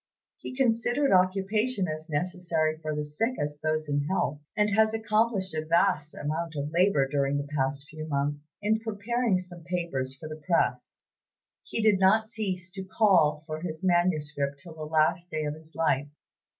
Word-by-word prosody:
He - - -8
considered 245 +2 +2
occupation 195 +3 +2
as 155 +1 -5
necessary 160 -1 -1
for 155 -1 -3
the 150 - -1
sick 225 +13 -1
as 145 0 -2
for 155 - -1
those 155 0 -1
in 145 0 0
health, 150 -4 -1 0.2
and 210 0 +3
has 220 +1 +3
accomplished 215 -3 +1
a 155 0 -2
vast 165 -1 +2
amount 160 +2 -3
of 145 +1 -3
labor 170 -5 +3
during 140 0 0
the 145 0 -3
past 140 +1 -1
few 155 +1 -7
months, 145 +1 -3
in 215 +1 +2
preparing 225 0 0
some 180 -1 -8
papers 165 -7 -2
for 155 +3 -9
the 155 0 -8
press. 170 - 0 0.6
He 225 - -3
did 210 -3 +5
not 215 +4 +4
cease 190 -6 -3
to 190 +1 -6
call 175 -7 +3
for 155 0 -5
his 165 0 -5
manuscript 150 -6 +1
till 160 +4 -9
the 155 -1 -7
last 160 +3 +1
day 155 -1 -2
of 150 - -2
his 155 +1 -14
life. 150 -3 +1
165 Hz, 175 wpm, -28 LUFS, 150-195 Hz, 0.6 s, did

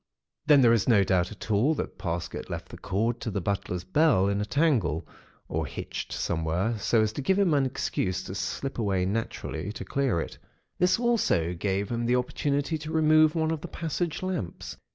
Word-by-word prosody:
"Then, 145 -3 +7
there 115 -1 +6
is 115 +1 +2
no 105 -4 +6
doubt 90 0 +1
at 105 +1 -7
all 120 +10 +3
but - - -1
that - - -13
Parsket 85 -1 -4
left - - -5
the - - -9
cord 115 +5 -1
to - - -3
the 100 - -2
butler's 90 -2 -2
bell 145 - +3
in 100 0 0
a - - -1
tangle, 110 - +1 0.4
or - - -2
hitched - - -6
somewhere, 85 +7 -1
so 110 +2 +3
as 110 0 -1
to 140 - -4
give 190 +8 +2
him 195 -5 +3
an 140 -2 +3
excuse 95 -7 -2
to - - -7
slip 100 +8 -3
away 95 -4 +1
naturally 105 -1 -3
to 110 - -7
clear 135 -10 0
it. - - -6 0.4
This 180 +1 +4
also 225 - +1
gave 95 +3 -1
him 120 0 -1
the 125 - +3
opportunity 145 +4 -1
to 155 +1 -6
remove 155 0 +4
one 160 -1 +1
of 160 -2 -2
the - - -6
passage 165 +1 -3
lamps. 180 - -4
115 Hz, 200 wpm, -27 LUFS, 95-150 Hz, 0.4 s, Then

